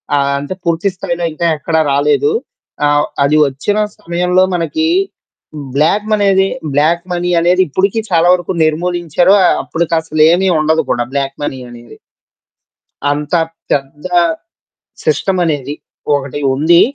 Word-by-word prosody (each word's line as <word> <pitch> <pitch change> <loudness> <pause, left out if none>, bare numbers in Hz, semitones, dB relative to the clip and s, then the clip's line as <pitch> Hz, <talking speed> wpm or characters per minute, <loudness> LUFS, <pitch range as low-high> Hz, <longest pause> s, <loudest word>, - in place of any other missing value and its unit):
ఆహ్, 140 0 +1
అంటే 145 +6 -5
పూర్తి 170 +4 +1
స్థాయిలో 175 -2 -3
ఇంకా 170 +2 -1
ఎక్కడ 160 +2 -3 0.2
రాలేదు. 150 - +2 0.5
ఆహ్, 145 0 +3 0.2
అది 150 +2 +3
ఒచ్చిన 145 +10 -2 0.2
సమయంలో 180 +2 +1
మనకి 315 - -1 0.9
బ్లాక్ 170 +9 +2
మనేది 195 -2 +3 0.3
బ్లాక్ 165 +4 +2
మనీ 175 0 -1
అనేది 180 +2 +3
ఇప్పడుకి 195 +8 0
చాలా 170 0 +3
వరకు 180 0 -1
నిర్మూలించారు. 175 +2 +1 0.3
అప్పటికసలేమీ 165 +2 +1
ఉండదు 160 +1 +2
కూడా 120 0 0
బ్లాక్ 140 -1 -2
మనీ 130 -2 -3
అనేది. 120 -1 -13 1.1
అంత 150 +3 -2 0.4
పెద్ద 145 +4 -3 1.0
సిస్టమ్ 180 +5 +1
అనేది 145 -2 -2 0.4
ఒకటి 140 0 -4
ఉంది. 165 +5 +4
165 Hz, 115 wpm, -14 LUFS, 145-180 Hz, 1.1 s, ఉంది